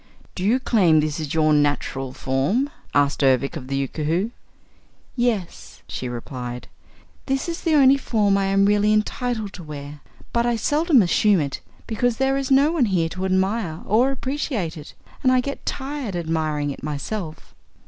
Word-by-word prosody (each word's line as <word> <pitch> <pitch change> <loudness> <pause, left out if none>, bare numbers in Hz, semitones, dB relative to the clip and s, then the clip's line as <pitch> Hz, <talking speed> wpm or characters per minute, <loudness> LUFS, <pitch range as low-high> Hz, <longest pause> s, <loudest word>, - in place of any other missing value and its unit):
"Do 180 - -5
you 230 +6 +3
claim 185 -11 +3
this 150 0 -1
is 155 -1 -4
your 155 -1 +3
natural 145 -3 0
form?" 160 - 0 0.2
asked 145 0 +2
Ervic 135 +2 +2
of 135 -5 -7
the 135 0 -2
Yookoohoo. 165 - -1 0.8
"Yes," 230 -8 -2
she 125 - -5
replied. 125 0 -6 0.6
"This 270 +2 -1
is 335 0 -4
the 325 -3 +2
only 275 -1 +6
form 210 -6 +1
I 195 0 +1
am 195 0 +3
really 210 +1 +3
entitled 215 0 -1
to 180 - -9
wear. 145 -1 -8 0.3
But 235 0 +2
I 240 - +1
seldom 290 - +3
assume 195 +2 +3
it 140 -3 -3 0.2
because 235 +1 0
there 265 0 +1
is 275 -1 -2
no 280 +3 +5
one 320 -7 +2
here 175 -6 +1
to 185 +3 -4
admire 190 -2 0
or 235 +6 +3
appreciate 265 - -3
it 150 -2 -11 0.3
and 255 - +3
I 255 - +4
get 280 +3 -5
tired 270 -7 -4
admiring 155 -3 -1
it - - -9
myself." 155 +4 -5
195 Hz, 170 wpm, -22 LUFS, 150-250 Hz, 0.8 s, only